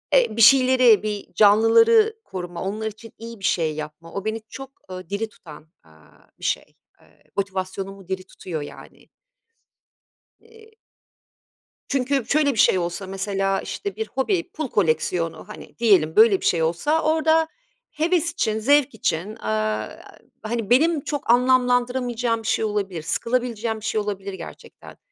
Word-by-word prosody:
e, 485 - +3
bir - - +2
şeyleri, 255 -3 +6
bir 210 -3 -5
canlıları 425 - +5
koruma, 175 -1 -6
onlar 215 +3 -3
için 220 +2 -10
iyi 230 -1 -9
bir 190 - -5
şey 160 -3 0
yapma, 155 +2 -8
o 200 +1 -5
beni 220 0 -2
çok, 270 0 -9 0.2
ııı, 185 -1 -8
diri 215 +2 -3
tutan, 155 -6 -14 0.2
aaa, 80 -1 -23
bir - - -8
şey, - - -2 0.3
eee, - - -26
motivasyonumu 195 -1 -4
diri 190 0 -4
tutuyor 160 -5 -6
yani. 145 - -12 1.3
Eee 445 -1 -19 1.2
Çünkü 270 -1 0
şöyle 285 0 +2
bir 220 - -4
şey - - +5
olsa 175 +2 -3
mesela 195 0 -1
işte 200 -1 -5
bir 220 0 -4
hobi, 340 +7 -1
pul 310 -3 -4
koleksiyonu, 165 -2 -1
hani, 210 - -12
diyelim. 190 -9 +3
Böyle 215 -3 +6
bir - - -5
şey 165 -2 +2
olsa 235 - 0
orada 315 +1 +2 0.4
heves 335 +1 0
için, 220 - -1
zevk 285 +2 +3
için, 185 -2 -2
eee, 215 - -8 1.1
hani 225 -1 -3
benim 300 +5 +3
çok 290 -5 -5
anlamlandıramayacağım 245 -2 +1
bir - - -6
şey 220 - +1
olabilir, 200 -5 -3
sıkılabileceğim 230 +3 -2
bir 215 - -10
şey 215 - 0
olabilir 200 -1 -5
gerçekten. - - -11
220 Hz, 150 wpm, -23 LUFS, 190-255 Hz, 1.3 s, şeyleri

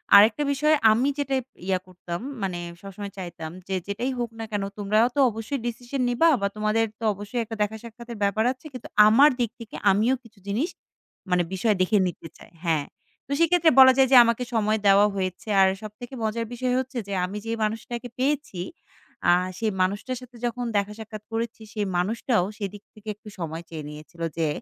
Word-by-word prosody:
আরেকটা 215 +8 +7
বিষয় 300 +3 +3 0.2
আমি 245 +5 +2
যেটা 275 -1 0 0.3
ইয়া 185 -1 +2
করতাম, 175 -1 -6 0.2
মানে 185 -2 -2 0.2
সবসময় 200 +1 -7
চাইতাম 170 -3 -6 0.2
যে 190 - -1
যেটাই 240 +6 -2
হোক 240 - -1
না 225 - -3
কেন, 205 -1 -1
তোমরাও 215 +3 +3
তো 285 - +1
অবশ্যই 225 +5 -4
ডিসিশন 245 +3 -4
নিবা। 325 +8 +4
বা 200 - +2
তোমাদের 215 +1 +1
তো - - -9
অবশ্যই 205 +5 -4
একটা 225 0 -7
দেখা 210 +1 0
সাক্ষাতের 235 0 -9
ব্যাপার 210 +2 +2
আছে। 260 +4 -11
কিন্তু 250 - -8 0.2
আমার 265 +8 +7
দিক 235 -3 +1
থেকে 230 - -10 0.2
আমিও 220 +7 +3
কিছু 220 -3 -19
জিনিস 240 - 0 0.6
মানে 180 -1 +3
বিষয় 210 +3 +2
দেখে 210 +3 +3
নিতে 170 -2 -7
চাই। - - -16
হ্যাঁ। 155 -4 +1 0.4
তো - - -10
সেক্ষেত্রে 335 -1 +4
বলা 260 0 +10
যায় 265 -1 +6
যে - - +7
আমাকে 235 +1 +1
সময় 220 -1 +2
দেওয়া 200 +1 +7
হয়েছে। 185 +1 -3
আর 190 - +7
সবথেকে 230 +5 -9
মজার 225 +1 -1
বিষয় 250 +1 -1
হচ্ছে 260 0 -5
যে 200 - -4
আমি 195 +3 -6
যে 225 - -3
মানুষটাকে 230 +3 -3
পেয়েছি, 275 -9 -1 0.7
আ - - +8 0.3
সেই 220 +1 0
মানুষটার 205 +7 -1
সাথে 250 -1 -14
যখন 240 +1 -2
দেখা 200 +1 -1
সাক্ষাৎ 215 -1 -8
করেছি 225 0 -3
সেই 210 -2 -1
মানুষটাও 215 +1 +1
সেদিক 200 -1 -5
থেকে 215 0 -18
একটু 210 +1 -18
সময় 165 0 -4
চেয়ে 155 -2 -6
নিয়েছিল। 155 +3 -11 0.2
যে 160 -2 +1
220 Hz, 190 wpm, -25 LUFS, 195-245 Hz, 0.7 s, বলা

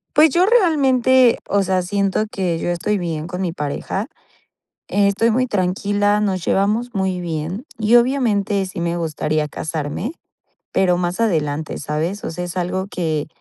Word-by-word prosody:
Pues, 305 +1 +6
yo 355 +6 +3
realmente, 265 - +4
o 200 0 +2
sea, 185 -1 +1
siento 200 +3 0
que 180 -4 -1
yo 175 - -2
estoy 185 +4 0
bien 165 -3 -3
con 180 0 -5
mi 180 -3 -1
pareja, 165 - -3 0.8
estoy 205 +3 +2
muy 255 +3 +2
tranquila, 205 0 +1
nos 190 -4 -1
llevamos 215 +5 +1
muy 190 -2 -1
bien 170 - -4
y 220 +2 +4
obviamente 225 -6 +2
sí 185 - -6
me 170 0 -1
gustaría 155 -2 -1
casarme, 155 - -4 0.6
pero 180 -2 +2
más 175 +2 -2
adelante, 155 -7 -1
¿sabes?, 160 +7 -3
o - - -3
sea, 180 +2 -5
es 175 +1 -5
algo 185 +1 -1
que, 160 -5 -2
190 Hz, 155 wpm, -20 LUFS, 170-215 Hz, 0.8 s, Pues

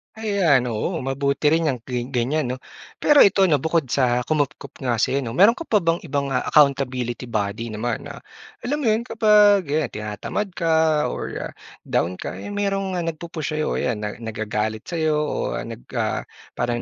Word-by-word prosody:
Ayan, 200 - +2
oo 145 - -2
mabuti 140 +2 -1
rin 165 0 +2
yang 130 -4 0
gi 125 -1 -3
ganyan 135 +4 0
'no? 125 - -3 0.4
Pero 295 -1 +6
ito 195 -1 +6
'no 155 -6 +3
bukod 160 0 +1
sa 125 -2 +2
kumupkop 150 -3 -2
nga 125 -3 0
sa'yo 135 +4 +1
'no? 115 -3 -5
Mayroon 205 +6 +7
ka 330 - -7
pa 215 - +4
bang 165 +1 +2
ibang 140 -3 -2
accountability 130 -3 +2
body 110 +1 -2
naman 115 +2 -3
na - - -8 0.5
alam 285 +4 0
mo - - -2
'yon 220 +2 +1
kapag 210 -5 +5
'yan 155 +1 +1
tinatamad 105 - -4
ka 160 -2 +2
or - - -5 0.3
down 90 +3 0
ka, - - -5
eh, - - -7
mayroong, 195 -2 -1
ah, 175 - -1
nagpu-push 165 -1 -4
sa'yo? 155 0 -1
'Yan 115 -4 -1
na 105 -1 -4
nagagalit 110 -1 -3
sa'yo 160 -3 0
o 150 - -2 0.2
nag, - - -8
ah, - - -1 0.3
parang 120 0 -1
145 Hz, 175 wpm, -22 LUFS, 120-175 Hz, 0.5 s, Mayroon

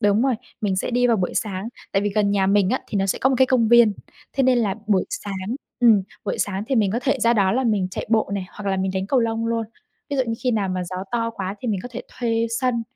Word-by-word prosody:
đúng 205 +2 +3
rồi, 265 -2 +2 0.3
mình 195 -3 0
sẽ 190 - -1
đi 245 +1 +3
vào 235 - +3
buổi 185 -3 -2
sáng. 200 0 -2 0.2
Tại 195 0 +2
vì 205 - 0
gần 200 0 +1
nhà 195 -1 +2
mình 200 -1 +3
á, 260 - 0
thì 205 - -1
nó 195 - +1
sẽ - - 0
có 265 - +3
một 265 - +2
cái 260 - +6
công 240 -4 +2
viên, 235 -2 +6 0.4
thế 270 - +1
nên 255 -1 +4
là 205 -5 +1
buổi 200 -3 +2
sáng 195 +2 -4 0.3
ừm, 220 -5 +6 0.2
buổi - - -2
sáng 200 0 -1
thì 265 - 0
mình 205 -4 +3
có 230 - 0
thể 275 -1 +1
ra 230 +1 +4
đó 195 -4 +3
là 260 +2 +1
mình 205 -5 +1
chạy - - -5
bộ 220 -3 +2
nè 195 - -2
hoặc 200 -1 -4
là 190 - 0
mình 190 0 0
đánh 190 0 -1
cầu 260 +3 +2
lông 230 0 -1
luôn, 230 -1 -1 0.4
ví 285 - -1
dụ 265 - +3
như 230 - -1
khi 250 - +3
nào 210 -5 0
mà 185 -1 -2
gió 185 +1 -6 0.2
to 230 -1 0
quá 195 -3 -4
thì 245 - -3
mình 200 -4 0
có - - -6
thể 245 - -5
thuê 230 -1 -1
sân 250 -3 +1
220 Hz, 290 wpm, -22 LUFS, 195-240 Hz, 0.4 s, cái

